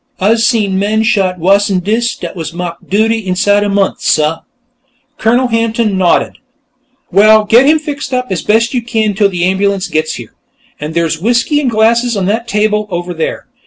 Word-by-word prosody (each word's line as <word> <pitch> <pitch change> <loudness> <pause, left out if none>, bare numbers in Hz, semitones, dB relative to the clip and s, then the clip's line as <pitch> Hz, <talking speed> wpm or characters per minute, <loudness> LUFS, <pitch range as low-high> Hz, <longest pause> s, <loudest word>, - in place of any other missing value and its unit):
"Ah's 220 +4 +2
seen 210 -5 +1
men 215 +2 0
shot 195 -6 +1
wuss'n 195 +2 +2
dis 230 +4 0
dat 170 +1 -7
was 165 -1 -6
ma'ked 175 -1 -6
'Duty' 220 +3 +1
inside 205 +3 +2
a 205 - -1
month, 200 -1 0
suh." 155 +1 +1 0.8
Colonel 245 +3 +1
Hampton 230 -2 0
nodded. 185 -2 +1 0.7
"Well, 215 +3 +5
get 240 +6 +4
him 310 +1 +5
fixed 295 -2 -6
up 250 0 -2
as 180 - -1
best 230 +3 +1
you 250 - 0
can, 220 -3 -1
till 200 0 +2
the 175 -2 -1
ambulance 195 +1 0
gets 155 0 -2
here. - - -10 0.5
And 150 +2 -6
there's 165 -1 -1
whiskey 240 - +1
and 265 - 0
glasses 230 +1 +1
on 190 - -1
that 225 +4 -1
table, 210 -1 0
over 175 -1 -4
there. 160 -1 -4
210 Hz, 180 wpm, -12 LUFS, 185-230 Hz, 0.8 s, Well